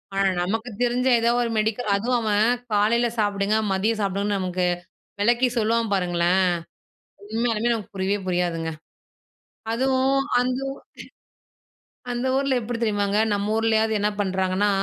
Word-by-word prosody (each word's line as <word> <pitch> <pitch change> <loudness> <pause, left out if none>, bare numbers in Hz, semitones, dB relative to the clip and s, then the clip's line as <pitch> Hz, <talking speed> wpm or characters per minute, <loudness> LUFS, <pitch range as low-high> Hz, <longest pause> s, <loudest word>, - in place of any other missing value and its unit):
ஆனா 195 0 +3
நமக்கு 225 +6 -2
தெரிஞ்ச 245 +1 +1
ஏதோ 230 +1 +2
ஒரு 235 - 0
மெடிக்கல் 215 +1 0
அதுவும் 240 +5 0
அவன் 215 0 +2 0.3
காலையில 230 +4 +3
சாப்பிடுங்க. 205 0 +1
மதியம் 215 +3 0
சாப்பிடுங்கன்னு 200 +1 -1
நமக்கு 180 -1 -1 0.6
விளக்கி 240 +4 +3
சொல்லுவான் 225 0 +1
பாருங்களேன். 180 0 +2 0.9
உண்மையாலுமே 230 +1 0
நமக்கு 220 -1 -6
புரியவே 195 +2 0
புரியாதுங்க. 170 -2 -1 1.0
அதுவும் 265 +2 +2 0.2
அந்த 255 +1 0
ஊர் - - -12 1.3
அந்த 245 +2 -2
ஊர்ல 275 -2 +1
எப்படி 230 +1 -4
தெரியுமாங்க? 205 -1 +1
நம்ம 205 +1 -1
ஊர்லயாவது 220 0 +2
என்ன 210 +1 +1
பண்ணுறாங்கன்னா, 190 +1 0
215 Hz, 125 wpm, -24 LUFS, 195-235 Hz, 1.3 s, ஆனா